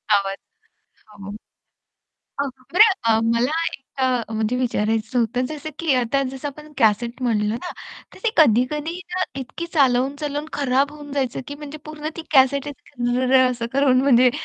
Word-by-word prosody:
आवाज. 195 -1 -1 0.7
हो 200 -2 -11 1.1
अगं 280 - 0
अ, - - -26
बरं 430 +3 +7
अ, 225 -1 +3
मला 235 +4 +2 0.2
एक 270 - -10 0.2
अ, 250 -3 +1
म्हणजे 220 +3 0
विचारायचं 225 -1 0
होतं 245 +2 0
जसं 310 +1 -6
की 325 -4 +1
आता 255 +3 +1
जसं 270 +2 -5
आपण 300 +2 -12
कॅसेट 235 +2 +1
म्हटलं 220 -4 +1
ना, 245 +11 -4 0.4
तर - - -14
ते 455 - +3
कधी-कधी 300 +5 +3 0.2
ना 370 - 0 0.2
इतकी 335 +6 -6
चालवून-चालवून 285 +2 +1
खराब 280 0 +1
होऊन 290 -2 -10
जायचं 265 -4 -1
की 285 - -5
म्हणजे 295 +1 -9
पूर्ण 305 0 -6
ती 330 - -5
कॅसेट 275 +1 +4
असं 245 -3 -4
रं-रं 260 0 +4
असं 235 -2 -3
करून 265 -2 +4
म्हणजे 250 -2 +5
260 Hz, 160 wpm, -22 LUFS, 240-290 Hz, 1.1 s, बरं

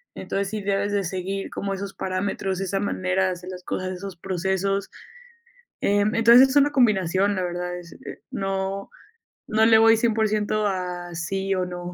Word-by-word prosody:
entonces, 200 0 -3
sí 215 -1 -4
debes 200 +1 0
de 200 -1 0
seguir 190 +2 -4
como 195 0 -3
esos 195 0 -5
parámetros, 190 0 -2
esa 195 0 -1
manera 190 -1 0
de 185 - 0
hacer 180 +1 -7
las 180 -1 -9
cosas, 185 +1 -3
esos 190 0 -7
procesos. 190 +2 -1 0.9
Em, 205 +2 +2
entonces, 235 +3 +7
es 265 - -2
una 285 +1 +5
combinación, 200 - +2
la 185 - -1
verdad, 180 0 -3
es 170 -1 -12 0.3
no 195 0 -3 0.6
no 220 +1 +3
le 225 -1 +7
voy 225 0 +6
100% 215 -2 +1
a 180 -2 -4
sí 195 +4 -2
o 185 - 0
no. 180 0 -6
195 Hz, 165 wpm, -24 LUFS, 185-205 Hz, 0.9 s, entonces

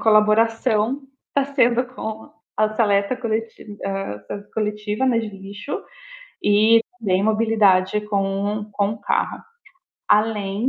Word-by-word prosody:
colaboração 225 +3 +3 0.3
tá 280 -1 +3
sendo 250 -3 +2
com 220 0 -6 0.2
a 215 0 +3
seleta 200 +1 +2
coleti 225 -3 -4
ah, 195 - -4
ah, 200 - -5
coletiva, 210 +2 -1
né, 245 -3 +3
de 225 -2 -3
lixo, 200 +5 -7 0.6
e 215 +2 +5 0.2
também 190 -3 +1
mobilidade 210 -3 +3
com 200 +1 -1
o 210 - -9
com 200 0 +1
o 215 - -9
carro. - - -1 0.7
Além 210 +1 +1
215 Hz, 125 wpm, -22 LUFS, 200-225 Hz, 0.7 s, e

